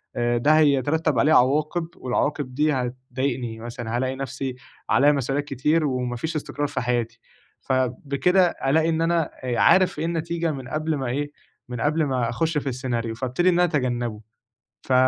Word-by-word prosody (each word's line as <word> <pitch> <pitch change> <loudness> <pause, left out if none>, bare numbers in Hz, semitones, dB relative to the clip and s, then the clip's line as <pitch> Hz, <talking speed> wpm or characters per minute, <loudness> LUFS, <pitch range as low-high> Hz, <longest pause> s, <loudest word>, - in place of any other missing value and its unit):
آآ 120 0 +1
ده 150 +6 +4
هيترتب 145 -1 +2
عليه 155 +5 +4
عواقب 155 +6 +2
والعواقب 130 +1 -2
دي 150 +1 +2
هتضايقني 125 -2 -3
مثلًا، 120 0 -4
هالاقي 130 +1 -1
نَفْسي 135 -1 -4 0.3
عليّا 145 +2 +5
مسؤوليات 140 +1 -1
كتير 150 +4 +1
وما 125 -2 -1
فيش 160 +6 -4
إستقرار 145 0 -3
في 130 - -3
حياتي، 120 -1 -1 0.4
فبكده 140 +8 +1
ألاقي 160 +4 +1
إن 160 0 0
أنا 165 -1 +1
آآ 125 -2 -1
عارف 185 -5 +4
إيه 160 - -1
النتيجة 170 0 -1
من 135 -4 -7
قبل 155 +1 -1
ما 135 - -3
إيه 145 +4 -2 0.4
من 120 -2 -5
قبل 155 +2 +1
ما 130 -4 0
أخُش 160 +5 -1
في 145 - -2
السيناريو، 120 -3 -3
فأبتدي 130 +9 +1
إن - - +3
أنا 175 - +4
أتجنّبه 120 -8 -1 0.6
ف 130 - 0
135 Hz, 165 wpm, -24 LUFS, 125-155 Hz, 0.6 s, عليّا